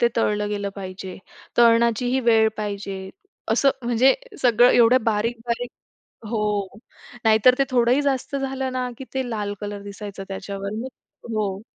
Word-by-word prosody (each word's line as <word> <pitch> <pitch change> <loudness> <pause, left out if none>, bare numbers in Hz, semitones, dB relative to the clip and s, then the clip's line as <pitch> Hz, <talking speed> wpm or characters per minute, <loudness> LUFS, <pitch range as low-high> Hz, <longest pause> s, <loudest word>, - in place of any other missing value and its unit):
ते 235 - +5
तळलं 210 -2 +1
गेलं 205 -1 -2
पाहिजे. 185 -1 -7 0.4
तळण्याचीही 235 +2 +4
वेळ 220 -1 +5
पाहिजे. 200 -2 -4 0.6
असं 275 +4 +4
म्हणजे 240 +3 +4 0.3
सगळं 245 0 +5
एवढं 245 +1 +5
बारीक, 230 +2 0
बारीक 240 +1 -2 0.6
हो. 225 -1 -1 0.8
नाहीतर 220 +3 +5
ते 275 - +4
थोडंही 250 +2 +3
जास्त 280 0 -1
झालं 265 -1 -3
ना, 255 -1 -2
की 265 - -7
ते 265 -2 -1
लाल 205 -2 -3
कलर 205 -1 -5
दिसायचं 200 -1 -8
त्याच्यावर 195 +1 -5
मग 260 - -5 0.5
हो. 200 -3 -1
230 Hz, 145 wpm, -23 LUFS, 205-250 Hz, 0.8 s, ते